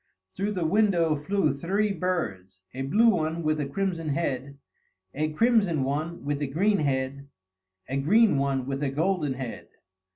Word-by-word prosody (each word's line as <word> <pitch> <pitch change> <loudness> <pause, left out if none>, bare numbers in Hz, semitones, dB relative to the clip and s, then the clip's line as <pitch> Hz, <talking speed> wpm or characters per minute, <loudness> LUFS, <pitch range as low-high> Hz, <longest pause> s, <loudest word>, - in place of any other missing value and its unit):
Through 200 +2 -2
the 180 -4 -1
window 175 -4 +3
flew 155 +3 0
three 195 +8 0
birds: 100 - -3
a 130 - -5
blue 210 +13 +4
one 165 -2 -1
with 155 0 +1
a 145 - -1
crimson 165 0 -2
head; 140 -3 -2 0.6
a 155 +2 -1
crimson 200 - +2
one 155 +5 -3
with 145 0 -2
a 145 - 0
green 195 +9 +1
head; 140 -1 -2 0.6
a 135 +3 -2
green 195 +3 +4
one 135 -2 0
with 135 +1 -3
a 145 - 0
golden 155 0 0
head. 130 -2 -7
155 Hz, 160 wpm, -26 LUFS, 140-185 Hz, 0.6 s, blue